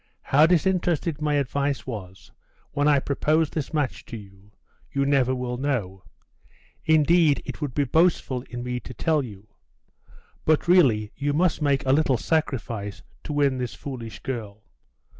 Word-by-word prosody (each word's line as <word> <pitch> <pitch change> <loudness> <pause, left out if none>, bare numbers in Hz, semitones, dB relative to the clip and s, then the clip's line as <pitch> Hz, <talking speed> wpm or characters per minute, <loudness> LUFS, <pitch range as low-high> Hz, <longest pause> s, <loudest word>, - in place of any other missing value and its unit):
How 150 +4 +5
disinterested 170 -3 +1
my 150 -1 +1
advice 140 0 -1
was 95 -6 -8 0.4
when 145 0 +1
I 145 -1 +5
proposed 150 +3 +1
this 150 -3 -3
match 150 -5 -1
to 115 - -6
you, 100 -1 -15 0.4
you 140 0 0
never 135 -2 +2
will 125 -1 -3
know; 105 -10 -2 0.8
indeed, 160 -1 +4
it - - -7
would 145 -4 -3
be 145 - +2
boastful 150 -3 +2
in 120 0 -5
me 125 0 -3
to 125 - -10
tell 155 +5 +1
you. 105 -5 -10 1.0
But 155 +2 +2
really 125 - +4
you 145 0 -1
must 165 +1 +1
make 140 -2 +1
a 130 - +3
little 140 -3 +3
sacrifice 115 -11 -2 0.2
to 150 - -4
win 140 -3 +2
this 125 -1 -4
foolish 115 -7 -7
girl. 110 -5 -5
140 Hz, 155 wpm, -25 LUFS, 120-150 Hz, 1.0 s, How